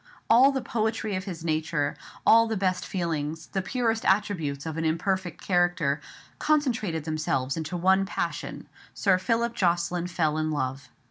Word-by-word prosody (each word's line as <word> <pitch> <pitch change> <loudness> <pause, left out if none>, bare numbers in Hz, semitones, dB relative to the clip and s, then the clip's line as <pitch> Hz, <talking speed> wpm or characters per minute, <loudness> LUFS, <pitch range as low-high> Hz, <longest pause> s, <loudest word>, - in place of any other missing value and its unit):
All 255 +4 +7
the 265 -2 -2
poetry 220 -3 -1
of 185 +1 -3
his 175 -4 -6
nature, 155 -2 0 0.3
all 230 0 +7
the 220 -1 -1
best 185 -1 0
feelings, 160 -3 -2
the 195 - +1
purest 225 +1 -1
attributes 170 -8 0
of 160 -1 -4
an 165 - -2
imperfect 175 +2 -1
character, 175 -5 +1 0.4
concentrated 235 - +1
themselves 155 -4 -1
into 160 +2 -3
one 190 +2 +3
passion, - - -4 0.3
Sir 185 -2 +3
Philip 230 +4 0
Jocelyn 175 -2 0
fell 155 -3 0
in 155 0 0
love. 135 -1 -3
175 Hz, 150 wpm, -27 LUFS, 160-210 Hz, 0.4 s, All